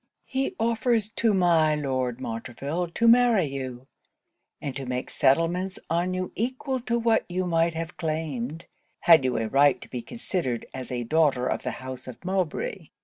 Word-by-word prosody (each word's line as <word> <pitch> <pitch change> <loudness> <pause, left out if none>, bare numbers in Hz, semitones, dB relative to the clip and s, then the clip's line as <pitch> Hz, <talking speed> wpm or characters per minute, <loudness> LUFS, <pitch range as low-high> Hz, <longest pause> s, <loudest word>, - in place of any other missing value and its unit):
'He 265 0 -2
offers 225 -1 +1
to 230 0 +1
my 170 -5 +4
Lord 130 -4 -1
Montreville 135 +8 -3
to 230 +8 +1
marry 235 -5 +6
you; 130 -3 -5 0.7
and 140 -3 -5
to 135 -2 -5
make 125 0 -3
settlements 170 +7 +2
on 175 +2 +1
you 185 0 -3
equal 260 +3 -2
to 235 -1 -1
what 230 -1 +2
you 185 +1 -1
might 165 -1 +1
have 165 +1 -5
claimed, 155 -2 -3 0.4
had 165 -5 +7
you 125 -2 0
a 115 0 -1
right 140 +5 +4
to - - -11
be 125 - -5
considered 145 - -3
as 130 -1 -6
a 120 -1 -2
daughter 145 -2 +2
of - - -1
the - - -3 0.2
house 130 0 -6
of 130 +7 -10
Mowbray. 185 -1 -2
165 Hz, 170 wpm, -26 LUFS, 130-190 Hz, 0.7 s, had